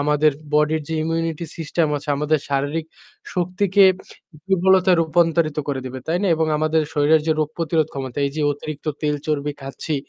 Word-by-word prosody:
আমাদের 150 +1 +3 0.2
body-র 150 +1 +3
যে 160 - -2
immunity 165 0 -2
system 165 0 0
আছে 145 +1 -8
আমাদের 150 +1 +1
শারীরিক 145 +3 -1 0.5
শক্তিকে 190 +2 +3 0.6
দুর্বলতায় 190 -1 +4
রূপান্তরিত 165 -1 +1
করে 135 -2 -1
দেবে। 130 +1 -6
তাই 170 +2 0
না? 200 - +1
এবং 160 0 +1
আমাদের 155 0 +2
শরীরের 150 +2 +4
যে 160 - +3
রোগ 150 - 0
প্রতিরোধ 160 -2 +1
ক্ষমতা, 135 -1 -5
এই - - -3
যে - - -1
অতিরিক্ত 150 +1 -8 0.2
তেল 150 -1 +1
চর্বি 145 -1 -1
খাচ্ছি, 135 +3 -4
155 Hz, 165 wpm, -21 LUFS, 145-165 Hz, 0.6 s, দুর্বলতায়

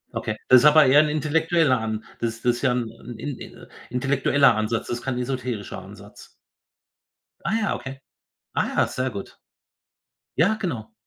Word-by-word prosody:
Okay, 110 0 -3
das 130 -1 +8
ist - - +2
aber 150 0 +7
eher 135 +3 +6
'n 150 - 0
intellektueller 155 -2 +2
An 110 0 -3 0.2
das 115 0 -3
das 120 0 +2
ist - - -8
ja 130 -3 +2
'n 120 -1 -5
in 140 +3 -5
in - - -11 0.2
intellektueller 135 +1 +3
Ansatz, 110 +1 -1
das 120 0 -3
kein 130 -2 -3
esoterischer 125 -4 -4
Ansatz. - - -13 1.2
Ah - - -1
ja, 215 - 0
okay. 135 0 -8 0.5
Ah - - 0
ja, - - +3
sehr 130 +1 -2
gut. 100 -2 -8 1.0
Ja, 190 +7 +3
genau. 120 - -5
130 Hz, 165 wpm, -24 LUFS, 115-145 Hz, 1.2 s, das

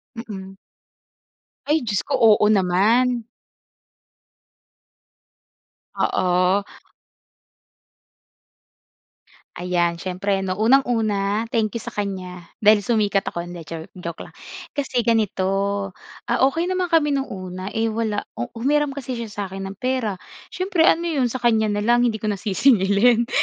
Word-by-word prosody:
Mm. 195 -4 -8 1.1
Ay 300 +2 +2
Diyos 200 -2 0
ko, - - -4
oo 215 -2 +5
naman! 215 +6 +2 2.7
Oo. 185 +2 +2 2.9
Ayan 175 -1 -1
siyempre 195 +1 -1
'no 185 -1 -3
unang-una, 220 -3 +2
thank 220 -1 0
you - - -7
sa - - -8
kan'ya 185 -3 -4 0.2
dahil 210 -1 +5
sumikat 205 -4 +1
ako, 170 0 -5
hindi 175 -1 -8
jo 160 0 -7
joke 170 -2 -7
lang, - - -16 0.4
kasi 260 -4 -1
ganito, 215 -5 +1 0.8
ah, - - 0
okey 330 +4 -2
naman 365 -1 -1
kami 300 -3 +3
nung 275 0 -1
una, 185 0 -6
eh, 225 +1 -1
wala 220 -2 -2
u 120 - -5
humiram 290 +4 +1
kasi 270 -2 -5
siya 235 -2 -5
sa 205 0 -4
akin 195 +1 -6
ng 195 - -10
pera 250 -6 -1 0.3
siyempre 365 -2 +2
ano 335 +1 +2
'yon 280 -7 0
sa 260 - -3
kanya 225 -3 +2
na 205 0 -1
lang 240 +1 +4
hindi 235 -3 +1
ko 210 -1 -2
nasisingilin? 215 +2 +3
215 Hz, 130 wpm, -22 LUFS, 190-245 Hz, 2.9 s, oo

